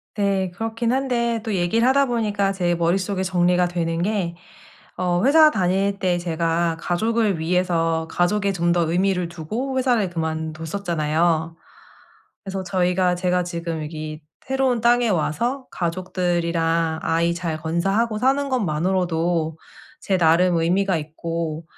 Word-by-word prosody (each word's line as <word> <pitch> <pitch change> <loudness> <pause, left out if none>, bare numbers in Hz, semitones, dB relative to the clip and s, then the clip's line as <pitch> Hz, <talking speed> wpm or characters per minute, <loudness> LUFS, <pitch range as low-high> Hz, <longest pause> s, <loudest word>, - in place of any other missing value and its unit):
네. 195 -2 0
그렇긴 225 +4 -2
한데 235 -4 0
또 220 -2 -3
얘기를 195 +6 +2
하다 275 +2 +4
보니까 210 -5 0
제 180 -3 0
머릿속에 185 +3 0
정리가 180 -1 +2
되는게 175 +2 -1 0.6
어 180 0 0
회사 310 +3 +7
다닐 195 -1 0
때 180 -2 +1
제가 165 -1 -1
가족을 215 +2 0
위해서 165 -1 0
가족에 200 +3 +1
좀 175 -2 0
더 170 -2 +1
의미를 180 -1 +1
두고 220 - -4
회사를 245 -7 +2
그만뒀었잖아요. 160 0 -1 0.9
그래서 195 -1 -4
저희가 180 0 +1
제가 180 0 0
지금 170 -2 -4
여기 155 0 -6 0.3
새로운 265 -2 +1
땅에 240 0 +4
와서 235 - -1
가족들이랑 170 -2 -1
아이 170 +1 +1
잘 170 -2 -3
건사하고 195 +8 0
사는 270 +4 +1
것만으로도 170 -5 0 0.4
제 195 -9 0
나름 170 +1 +4
의미가 180 +3 +1
있고 160 +1 -4
180 Hz, 290 characters per minute, -22 LUFS, 165-205 Hz, 0.9 s, 회사